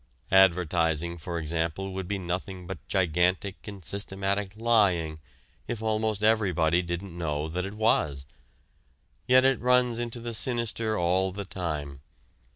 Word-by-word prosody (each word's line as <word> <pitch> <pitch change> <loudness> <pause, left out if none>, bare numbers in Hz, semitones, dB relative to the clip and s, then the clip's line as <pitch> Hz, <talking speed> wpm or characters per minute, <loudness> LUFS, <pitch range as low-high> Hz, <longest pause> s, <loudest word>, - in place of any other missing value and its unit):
Advertising, 85 -3 +3
for 85 +2 -4
example, 85 +4 -2
would 95 -1 -4
be 100 +1 -1
nothing 90 0 -4
but 85 -2 -6
gigantic 90 +2 0
and 100 -4 -9
systematic 100 +1 -2
lying 100 -9 +2 0.5
if 120 - -3
almost 110 -1 -1
everybody 90 -6 +3
didn't 85 +1 -5
know 75 -3 -2
that 90 +3 -3
it 100 +2 -7
was. 75 -11 +1 1.0
Yet 130 +1 +6
it 135 -2 +3
runs 125 -1 +3
into 120 0 -3
the 120 0 -5
sinister 115 -2 0
all 90 +2 +1
the 100 +1 -6
time. 75 -7 -4
95 Hz, 135 wpm, -27 LUFS, 85-110 Hz, 1.0 s, Yet